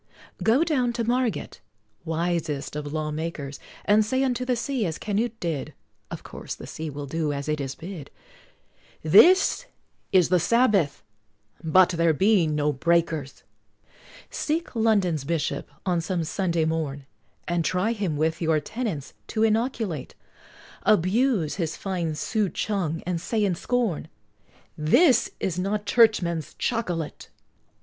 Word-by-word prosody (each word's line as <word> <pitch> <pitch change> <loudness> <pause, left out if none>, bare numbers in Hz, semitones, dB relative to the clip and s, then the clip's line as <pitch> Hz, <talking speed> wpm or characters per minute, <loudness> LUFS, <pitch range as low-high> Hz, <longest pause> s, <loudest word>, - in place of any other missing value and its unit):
Go 240 +8 +4
down 260 -8 +1
to 235 0 -1
Margate, 240 - -1 0.4
wisest 160 -4 -2
of 145 -1 -4
law 155 0 -2
makers, 150 -3 -5 0.3
And 210 +1 +5
say 260 +5 0
unto 250 -2 0
the 250 -1 +1
sea, 245 +1 -2
as 160 - -4
Canute 225 +2 -2
did, 165 -5 -3 0.3
(Of - - -7
course - - -7
the - - -10
sea 160 0 -6
will 145 0 -6
do 155 +1 -1
as 140 0 -4
it 150 -1 -1
is 135 -1 -4
bid,) 165 -5 -8 0.9
"This 365 - +6 0.4
is 185 -4 +4
the 180 0 +4
Sabbath 200 - +2 0.6
but 180 +3 +5
there 170 -2 +2
be 190 0 +3
no 150 -1 0
Breakers!" 160 -1 0 0.9
Seek 320 -2 -2
London's 200 - +2
Bishop, 160 +1 -2 0.2
on 175 -3 +1
some 175 0 -2
Sunday 170 -1 0
morn, 155 -4 -2 0.4
And 175 -1 0
try 185 +6 +1
him 195 -9 -2
with 160 +3 0
your 160 -2 +2
tenets 190 - -4
to 220 - 0
inoculate, 220 - -1 0.7
Abuse 210 - +2
his 165 -4 -2
fine 175 -5 -2
souchong, 195 -3 -1
and 175 -2 -2
say 215 +3 0
in 190 - +1
scorn, 230 -1 -1 0.7
"This 235 - +4
is 180 -1 -2
not 205 +3 -1
Churchman's 175 - +2
Chocolate!" 175 -10 -3
175 Hz, 135 wpm, -25 LUFS, 155-220 Hz, 0.9 s, This